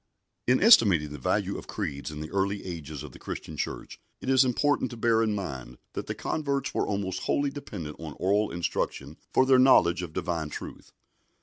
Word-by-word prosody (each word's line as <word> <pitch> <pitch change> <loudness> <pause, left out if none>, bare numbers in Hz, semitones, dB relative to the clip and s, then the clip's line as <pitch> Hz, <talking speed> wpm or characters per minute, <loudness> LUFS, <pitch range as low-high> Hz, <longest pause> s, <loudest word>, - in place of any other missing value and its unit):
In 125 +7 +4
estimating 100 - +6
the 75 - -7
value - - 0
of - - -12
creeds 70 +1 -4
in 75 0 -7
the 80 - -7
early 100 +1 -1
ages 80 -5 -6
of 75 - -9
the - - -14
Christian 80 - -6
Church, - - -5 0.2
it 130 - -2
is 130 0 +6
important 130 +1 +1
to 120 - -8
bear 115 0 +3
in 110 -2 +1
mind 65 -11 -6 0.2
that - - -5
the - - -3
converts 140 -3 -2
were - - 0
almost 95 -2 -2
wholly 140 -1 +1
dependent 90 - -7
on 80 -3 -7
oral 100 +3 +2
instruction 80 -3 -3
for 130 - +4
their 130 -1 +5
knowledge 90 -9 +5
of 90 -3 -6
Divine 80 -1 -2
truth. - - -9
95 Hz, 195 wpm, -27 LUFS, 75-125 Hz, 0.2 s, estimating